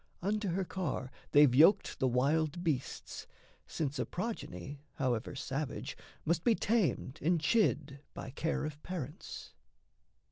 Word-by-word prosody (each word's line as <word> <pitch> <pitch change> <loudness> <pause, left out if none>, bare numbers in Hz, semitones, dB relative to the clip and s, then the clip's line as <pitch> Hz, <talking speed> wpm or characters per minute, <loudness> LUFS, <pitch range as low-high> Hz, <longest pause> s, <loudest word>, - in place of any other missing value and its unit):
Unto 210 +2 0
her 185 +2 0
car 155 -9 -3 0.2
They've 145 -3 +7
yoked 160 +10 +5
the 130 - +3
wild 150 +7 +1
beasts, 145 -7 -3 0.4
since 145 -3 -2
a - - +1
progeny, 145 - -5
However 125 0 -1
savage, 135 +2 -3 0.3
must 165 +1 +1
be 235 - +4
tamed 195 - 0
and 170 +2 +3
chid 150 -6 +2 0.2
By 130 - -6
care 160 +4 -1
of 150 -1 -6
parents. 165 -4 -6
155 Hz, 130 wpm, -33 LUFS, 135-180 Hz, 0.4 s, They've